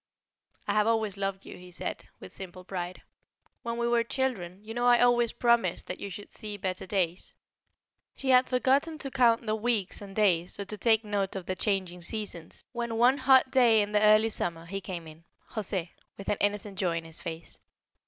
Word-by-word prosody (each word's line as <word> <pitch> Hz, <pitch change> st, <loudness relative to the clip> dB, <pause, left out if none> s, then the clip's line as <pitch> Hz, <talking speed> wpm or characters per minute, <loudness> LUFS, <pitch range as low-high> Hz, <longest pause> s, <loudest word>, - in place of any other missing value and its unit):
"I -, -, +1 dB
have 210 Hz, 0 st, +3 dB
always 220 Hz, -3 st, +1 dB
loved 195 Hz, -1 st, -3 dB
you," -, -, -9 dB
he 180 Hz, 0 st, -12 dB
said, 180 Hz, -, -5 dB
with -, -, -11 dB
simple 185 Hz, -1 st, -9 dB
pride. 180 Hz, -1 st, -5 dB, 0.6 s
"When 235 Hz, 0 st, -4 dB
we 235 Hz, 0 st, 0 dB
were 235 Hz, -1 st, +3 dB
children, 225 Hz, -8 st, -2 dB
you 225 Hz, -, -6 dB
know 240 Hz, +1 st, +1 dB
I 240 Hz, -1 st, +6 dB
always 240 Hz, -1 st, +4 dB
promised 235 Hz, -7 st, +1 dB
that 180 Hz, -, -6 dB
you 200 Hz, -, -5 dB
should 205 Hz, +2 st, -9 dB
see 210 Hz, -2 st, -5 dB
better 185 Hz, -2 st, -4 dB
days." 180 Hz, -3 st, -1 dB, 0.8 s
She 270 Hz, -, -3 dB
had 255 Hz, 0 st, +5 dB
forgotten 270 Hz, +5 st, +2 dB
to 275 Hz, -3 st, -5 dB
count 240 Hz, -3 st, +3 dB
the 215 Hz, -, 0 dB
weeks 220 Hz, -4 st, -1 dB
and 195 Hz, -1 st, -10 dB
days, 185 Hz, -4 st, +2 dB
or 200 Hz, -, -3 dB
to 210 Hz, +2 st, -7 dB
take 225 Hz, +1 st, +4 dB
note 200 Hz, -2 st, -1 dB
of 190 Hz, -2 st, -5 dB
the 185 Hz, -, -2 dB
changing 185 Hz, -3 st, -2 dB
seasons, 175 Hz, -3 st, -6 dB
when 235 Hz, -1 st, -3 dB
one 250 Hz, +4 st, +4 dB
hot 260 Hz, 0 st, +5 dB
day 235 Hz, -5 st, +5 dB
in 205 Hz, -, -5 dB
the 210 Hz, 0 st, +2 dB
early 215 Hz, +1 st, +5 dB
summer 170 Hz, -4 st, -1 dB
he 195 Hz, +3 st, -5 dB
came 175 Hz, -3 st, -6 dB
in 160 Hz, +1 st, -13 dB, 0.3 s
José 190 Hz, -5 st, -2 dB, 0.3 s
with 195 Hz, -, -6 dB
an 205 Hz, -, +1 dB
innocent 205 Hz, -1 st, -1 dB
joy 175 Hz, -3 st, +1 dB
in 165 Hz, -, -5 dB
his 165 Hz, +1 st, -5 dB
face. 165 Hz, -1 st, -7 dB
205 Hz, 205 wpm, -29 LUFS, 185-235 Hz, 0.8 s, I